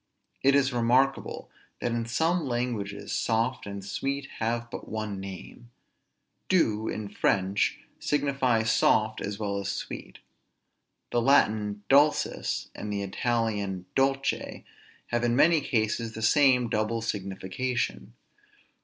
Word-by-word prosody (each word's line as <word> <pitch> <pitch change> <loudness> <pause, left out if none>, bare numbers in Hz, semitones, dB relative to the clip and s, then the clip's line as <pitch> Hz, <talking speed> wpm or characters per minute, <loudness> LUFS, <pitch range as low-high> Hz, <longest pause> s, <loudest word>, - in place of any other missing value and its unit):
It 135 +1 +4
is 135 -2 +3
remarkable, 125 +3 +1 0.3
that 120 - -1
in 115 0 -2
some 160 +6 +1
languages 120 -5 -3
soft 115 +1 0
and 100 -1 -6
sweet 135 +6 -3
have 115 +1 -1
but - - -7
one 110 -2 -4
name. 95 +4 -9 0.8
Doux 110 - +2
in 110 -1 -3
French 95 0 +1 0.2
signifies 135 -6 +1
soft 110 0 +2
as 100 0 -3
well 100 -2 -2
as 100 0 -3
sweet. - - -6 0.9
The 120 - +2
Latin 105 -5 +2
dulcis, 145 +2 +2
and 105 - -6
the 100 -1 -2
Italian 100 -3 -1
dolce, 135 0 0 0.4
have 120 0 0
in 120 0 +2
many 160 +3 +5
cases 115 -3 -1
the 110 - -6
same 125 0 +4
double 110 +1 -1
signification. 105 +4 -3
115 Hz, 120 wpm, -28 LUFS, 105-130 Hz, 0.9 s, many